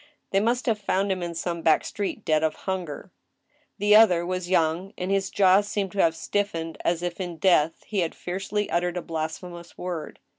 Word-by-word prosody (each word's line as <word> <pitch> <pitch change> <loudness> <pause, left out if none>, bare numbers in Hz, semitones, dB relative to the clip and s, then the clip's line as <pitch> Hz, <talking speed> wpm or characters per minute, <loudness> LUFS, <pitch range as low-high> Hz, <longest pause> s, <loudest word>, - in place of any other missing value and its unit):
They 195 - +3
must 235 +4 0
have 225 -4 +1
found 195 -1 0
him 185 -1 -1
in 170 -1 -4
some 170 0 -3
back 160 -1 +3
street, 205 +1 -4
dead 155 -1 +3
of 160 - +1
hunger. 185 -6 -4 0.7
The 205 +1 +4
other 180 -6 +6
was 185 0 -3
young, 175 +2 +1
and 185 +1 -3
his 195 -1 +1
jaws 195 +1 +4
seemed 200 -3 -2
to 195 - +1
have 165 -1 +3
stiffened 165 -5 -2
as 170 0 0
if, 175 +1 -3
in 175 -2 -5
death, 165 -2 +3
he 210 - -2
had 170 -3 -1
fiercely 200 +3 -3
uttered 175 +1 0
a 180 - -3
blasphemous 170 +2 -6
word. 175 -4 -5
180 Hz, 195 wpm, -25 LUFS, 170-195 Hz, 0.7 s, other